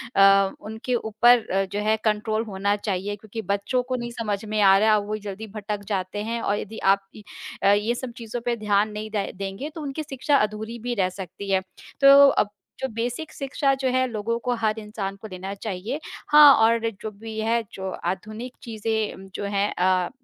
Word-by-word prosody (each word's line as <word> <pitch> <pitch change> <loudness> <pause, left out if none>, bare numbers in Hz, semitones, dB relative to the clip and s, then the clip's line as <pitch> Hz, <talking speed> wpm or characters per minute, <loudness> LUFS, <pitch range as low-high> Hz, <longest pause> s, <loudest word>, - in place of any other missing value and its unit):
अ, 195 0 +6
उनके 220 +4 -3
ऊपर 230 +1 +4 0.3
जो 205 - -1
है 215 +1 +3
कंट्रोल 215 +1 +1
होना 200 -1 0
चाहिए, 205 -1 -3
क्योंकि 215 +2 -7
बच्चों 205 +5 0
को 255 +1 -3
नहीं 240 -1 -4
समझ 210 -4 -3
में 215 0 -1
आ 195 -1 +7
रहा, 215 +1 +4
वो 210 +1 -3
जल्दी 205 +3 -6
भटक 205 -1 -4
जाते 200 0 -2
हैं 230 +1 -3
और 205 - 0
यदि 220 +2 -7 0.2
आप 195 0 -5
इ 215 - -11 0.4
अ, 200 - +6
ये 210 +4 +1
सब 250 0 -5
चीज़ों 235 +1 -5
पे 240 -1 +1
ध्यान 210 -1 +1
नहीं 210 +1 -5
दे 205 -2 -2
देंगे, 195 +9 -5
तो 320 - -6
उनकी 290 +1 -4
शिक्षा 280 0 0
अधूरी 215 +1 -2
भी 245 +2 -3
रह 190 -4 +1
सकती 190 +1 -8
है। 190 -1 +3 0.4
तो 275 - +7 0.2
अब 210 - +1 0.3
जो 265 - -1
बेसिक 245 +7 -3
शिक्षा 275 0 0
जो 265 -1 -1
है, 255 0 +2
लोगों 230 0 -2
को, 245 +1 -1
हर 220 -1 0
इंसान 210 -2 -5
को 220 - -7
देना 190 0 -6
चाहिए। 205 +6 -4 0.3
हाँ, 295 -1 +9
और 230 +1 +3
जो 220 - -4
भी 220 +1 -8
है, 230 +1 +1
जो 190 0 -4 0.2
आधुनिक 215 +7 -4
चीज़ें 220 -4 -3
जो - - -4
हैं 200 0 0
अ, 185 -1 +2
215 Hz, 200 wpm, -24 LUFS, 200-235 Hz, 0.4 s, हाँ